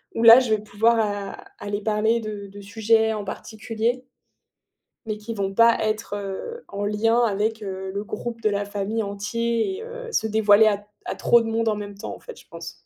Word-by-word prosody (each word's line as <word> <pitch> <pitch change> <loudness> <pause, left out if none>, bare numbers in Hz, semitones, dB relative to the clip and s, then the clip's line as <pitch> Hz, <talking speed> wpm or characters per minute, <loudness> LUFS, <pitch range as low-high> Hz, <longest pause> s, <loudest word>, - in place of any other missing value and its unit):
où 225 - 0
là 230 +2 +11
je 245 -4 -2
vais 215 - +2
pouvoir 220 +3 +2
a 205 -2 -1 0.3
aller 205 0 -3
parler 220 +2 +1
de 210 -2 -6
de 200 +1 -11
sujets 220 +2 +2
en 210 -2 -4
particulier 225 +4 -3 1.0
mais 215 -1 -3
qui 215 +2 -6
vont 195 -2 -2
pas 230 +2 +5
être, 215 -1 -2
heu, 205 - -6
en 200 0 -3
lien 225 +3 +2
avec, 220 0 0
heu, 190 -1 -5
le 200 +1 -3
groupe 230 +1 -5
de 215 - +2
la 205 0 -1
famille 205 +2 -2
entier 230 - -1
et 445 - -7
heu, 480 0 -8
se 220 - +1
dévoiler 215 0 +5
à 205 -1 0 0.2
à - - -3
trop 235 - +4
de 230 - -4
monde 225 0 0
en 215 - +2
même 205 -1 -7
temps - - -6
en - - -14
fait, 485 - -11
je - - -19
pense. 170 0 -10
215 Hz, 210 wpm, -24 LUFS, 205-230 Hz, 1.0 s, là